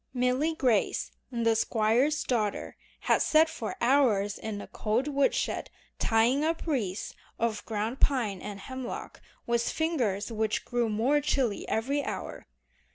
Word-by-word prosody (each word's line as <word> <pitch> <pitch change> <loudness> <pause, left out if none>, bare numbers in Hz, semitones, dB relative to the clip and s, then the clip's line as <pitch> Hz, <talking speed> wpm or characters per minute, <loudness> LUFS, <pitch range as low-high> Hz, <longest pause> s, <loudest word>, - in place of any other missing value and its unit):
Milly 255 +6 +1
Grace, 245 -9 +1 0.2
the 230 -2 +2
Squire's 230 +7 +2
daughter, 215 -5 -1 0.3
had - - +3
sat 315 +1 +5
for 220 - -5
hours 235 -6 +3
in 215 -2 -4
a - - -7
cold 230 +6 -1
woodshed 280 -1 0 0.3
tying 235 +6 +3
up 325 +1 -1
wreaths 220 - -2 0.2
of 225 -2 -1
ground 220 +3 -2
pine 225 -9 +1
and 205 -1 -7
hemlock 260 +2 -6 0.2
with 235 0 +1
fingers 245 - -1
which 220 -1 -1
grew 240 -2 0
more 245 +8 +2
chilly 265 -7 0
every 275 +6 0
hour. - - -6
235 Hz, 135 wpm, -29 LUFS, 215-275 Hz, 0.3 s, sat